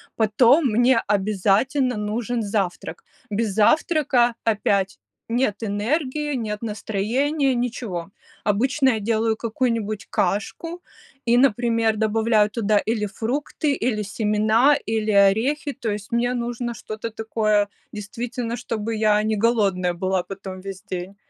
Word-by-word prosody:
Потом 235 +7 +4
мне 245 +2 +4
обязательно 215 +6 +1
нужен 225 +3 -2
завтрак. 200 - -3 0.3
Без 215 +1 -1
завтрака 250 - +3
опять 200 -3 0 0.3
нет 230 -3 0
энергии, 265 +8 -1
нет 215 -3 -3
настроения, 250 +7 0
ничего. 230 -8 -3 0.3
Обычно 260 +7 +2
я 225 -3 +1
делаю 220 +1 +1
какую-нибудь 225 -2 -2
кашку 330 - -2 0.4
и, 240 +1 +4
например, 230 -3 +2
добавляю 220 0 +2
туда 210 -1 +1
или 220 -1 -1
фрукты, 275 - -2
или 225 -4 -1
семена, 215 +6 +2
или 220 -1 0
орехи. 225 +9 +3
То 230 -6 -3
есть 205 +1 -6
мне 240 +1 +1
нужно 240 0 -3
что-то 215 0 -6
такое, 215 -2 +1 0.2
действительно, 235 +3 -4
чтобы 225 -2 -3
я 210 -1 +3
не 215 0 0
голодная 200 -5 +1
была 185 +1 -1
потом 190 -1 -8
весь 195 0 -7
день. 190 -1 -6
220 Hz, 120 wpm, -23 LUFS, 210-245 Hz, 0.4 s, Потом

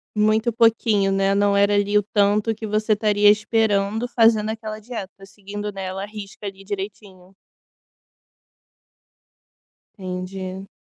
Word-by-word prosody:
Muito 215 +2 +2
pouquinho, 220 -3 +3
né, 195 0 +2
não 200 0 +2
era 200 +1 +3
ali 205 0 +2
o 205 - +2
tanto 205 +2 +1
que 220 0 -7
você 215 +1 +1
estaria 210 -1 +2
esperando 210 +1 0
fazendo 225 -3 +3
aquela 220 -1 -6
dieta 205 -4 -8
seguindo, 205 +1 -7
né, 195 -1 -6
ela 190 +1 -5
a - - -3
risca 210 -1 -10
ali 195 -1 -7
direitinho. 195 -2 -8 2.6
Entendi. 185 0 -6
205 Hz, 130 wpm, -22 LUFS, 195-215 Hz, 2.6 s, pouquinho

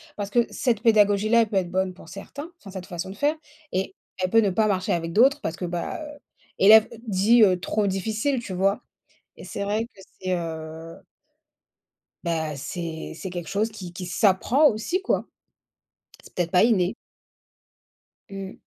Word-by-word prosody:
Parce 200 -1 -4
que 235 +2 +3
cette 235 -5 0
pédagogie-là, 215 0 +4
elle 225 - 0
peut 200 - 0
être 180 -2 -1
bonne 185 0 0
pour 180 -3 -15
certains, 285 - -8
enfin, 195 -7 -12
cette 190 -2 -7
façon 185 0 -5
de 195 - -8
faire 295 +8 +1 0.4
et 190 +1 -2 0.2
elle 185 -1 -1
peut, 225 - +5
ne 205 - +2
pas 215 +4 +2
marcher 190 -2 0
avec 165 -1 -2
d'autres, 270 - +4
parce 160 - -3
que, 180 - -5
bah, 175 - -4
heu, 295 -1 -9 0.4
élève 215 +2 +8 0.2
dit, 215 +4 +5
heu: 185 -3 +4
«Trop 205 +2 0
difficile.» 220 +8 -1
Tu 200 - -7
vois? 195 +2 +1 0.5
Et - - -11
c'est 200 - -4
vrai 210 +3 -1
que 215 -5 -18 0.2
c'est, 185 0 -3
heu 160 0 -6 1.3
bah, 160 -3 -2
c'est 160 +3 -5
c'est 190 - -6
quelque 175 -2 -6
chose 215 +3 0
qui 190 -5 -9
qui 180 +1 -7
s'apprend 210 - +3
aussi 240 - -2
quoi. 395 - 0 1.0
C'est - - -16
peut-être 175 -2 -1
pas 180 - +5
inné. 200 -4 +2 1.4
Mmh. 195 0 -7
195 Hz, 175 wpm, -25 LUFS, 180-220 Hz, 1.4 s, élève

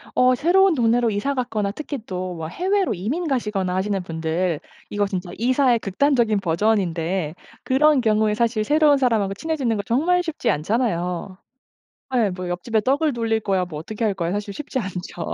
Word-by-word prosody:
어 255 0 +4
새로운 350 +6 +4
동네로 235 -1 +2
이사 215 +7 -1
갔거나 225 -6 -1
특히 290 +5 -5
또 185 -2 -4
막 160 -1 -5
해외로 380 - 0
이민 245 - -2
가시거나 210 -9 -1
하시는 195 +1 -1
분들 165 0 -2 0.3
이거 205 0 0
진짜 185 -2 -4
이사의 250 +1 +2
극단적인 225 +1 +1
버전인데 175 -3 0 0.3
그런 285 +2 +4
경우에 215 -2 +2
사실 230 -1 +1
새로운 295 +3 +4
사람하고 220 -6 +1
친해지는 270 -1 -1
거 - - -1
정말 330 - +2
쉽지 325 -3 -1
않잖아요. 180 - -1 0.8
예 225 -5 +3
뭐 180 -1 -5
옆집에 180 +6 -1
떡을 280 +7 +1
돌릴 225 -2 -1
거야 190 -3 0
뭐 165 -4 -8
어떻게 215 +9 -4
할 210 - +1
거야 170 -2 -2
사실 205 +1 -3
쉽지 285 +1 -4
않죠. 180 -4 -5
215 Hz, 375 characters per minute, -22 LUFS, 185-260 Hz, 0.8 s, 어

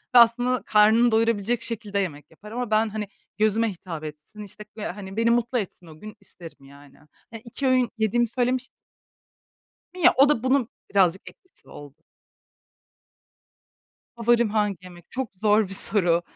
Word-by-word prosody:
ve - - +10
aslında 245 +2 +3
karnını 220 +3 +4
doyurabilecek 225 0 +1
şekilde 210 -3 -2
yemek 155 -7 -5
yapar. 210 +6 -14
Ama 245 -2 -4
ben, 215 +1 +2
hani, 210 -1 -5 0.3
gözüme 215 +1 +2
hitap 170 -4 -8
etsin, 155 +8 -10
işte, 210 +1 -10
böyle, 215 - -5
hani, 195 +1 -10
beni 230 0 +2
mutlu 240 +1 +1
etsin 185 -4 -6
o 155 -1 -14
gün 215 +2 -10
isterim, 165 -7 -14
yani. 140 0 -17 0.5
2 260 +3 -3
öğün 255 -2 +2
yediğimi 225 +2 +1
söylemiş 250 +2 -1 1.3
Ya 365 -3 +4
o 280 +2 +6
da 250 -5 +1
bunun 260 -2 +1 0.2
birazcık 190 -2 +2
etkisi 370 - -23
oldu. 145 -1 -12 2.2
Favorim 235 -1 +2
hangi 210 -2 0
yemek? 175 -2 -15
Çok 260 -3 -3
zor 210 -1 +3
bir 195 - -7
soru. 180 -4 +1
215 Hz, 150 wpm, -24 LUFS, 190-235 Hz, 2.2 s, ve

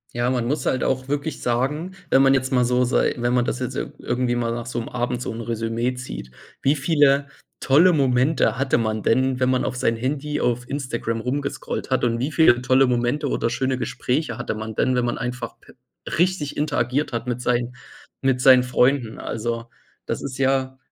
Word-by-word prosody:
Ja, 120 0 0
man 125 -2 0
muss 140 +1 -1
halt 130 - 0
auch 130 0 -1
wirklich 145 +2 -2
sagen, 140 +9 -1 0.2
wenn 135 -2 +5
man 135 0 +5
jetzt 130 -1 0
mal 125 -2 +3
so 125 +1 +2
sei 125 - +2
wenn 120 0 0
man 125 -1 +2
das 125 - -2
jetzt 130 0 -4
ir - - -4
irgendwie 120 0 -1
mal 120 -1 -1
nach 120 0 -4
so 120 -1 -3
'm 115 - -7
Abend 120 0 -2
so - - -3
'n 115 - -6
Resümee 115 +2 -2
zieht, 65 - -8 0.3
wie 140 +2 +3
viele 145 -2 +3 0.3
tolle 165 +7 +5
Momente 135 -1 +2
hatte 135 -1 +1
man 110 -2 -1
denn, 130 +2 +2
wenn 130 0 +2
man 130 - +1
auf 130 - -2
sein 115 -2 +1
Handy 145 +5 -2
auf 125 0 0
Instagram 120 -5 -3
rumgescrollt 140 +3 -3
hat? 130 - +1
Und 115 -1 +1
wie 135 +5 -1
viele 150 -6 +5
tolle 130 +1 +4
Momente 125 +4 0
oder 115 - -1
schöne 130 +1 -1
Gespräche 135 +4 -2
hatte - - -3
man 110 +1 -5
denn, 130 +4 +1
wenn 125 -1 +1
man 120 - -2
einfach, 125 0 -4
äh, - - -15 0.4
richtig 175 -4 0
interagiert 145 -1 0
hat 115 +1 -3
mit 120 0 -2
sein 125 0 0 0.5
mit 130 -2 +1
seinen 130 -1 +7
Freunden. 125 -1 +1
Also, 115 +1 -4 0.4
das - - -3
ist 135 -1 -5
ja 130 -1 +1
125 Hz, 205 wpm, -23 LUFS, 120-135 Hz, 0.5 s, seinen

